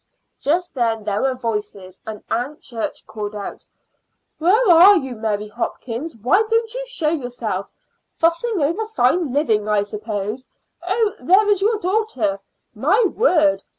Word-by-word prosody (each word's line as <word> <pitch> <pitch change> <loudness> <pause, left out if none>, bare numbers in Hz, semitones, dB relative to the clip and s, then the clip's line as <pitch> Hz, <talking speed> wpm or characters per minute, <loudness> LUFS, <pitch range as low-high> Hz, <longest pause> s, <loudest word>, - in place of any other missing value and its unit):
Just 345 +5 0
then 230 -4 0
there 205 0 -1
were 265 -1 +1
voices, 210 -6 -5
and 215 -1 -7
Aunt 250 +6 -2
Church 230 -3 -5
called 210 -1 -6
out: 205 -1 -7 0.8
"Where 410 +9 +3
are 370 +5 +8
you, 265 -6 -3
Mary 215 -2 -2
Hopkins? 235 +6 -5
Why 250 - +3
don't 455 0 +1
you - - -4
show 350 -12 -1
yourself? 245 - -3 0.5
Fussing 340 +6 +1
over 350 +10 -1
fine 335 - +1
living, 225 -7 +1
I 210 -1 +2
suppose. 210 +3 -5 0.3
Oh, 405 +4 0
there 375 +11 +4
is 405 -2 +2
your 435 +2 +2
daughter. 365 - -1 0.3
My 310 - +2 0.2
word! 315 -10 +3
265 Hz, 145 wpm, -20 LUFS, -, 0.8 s, are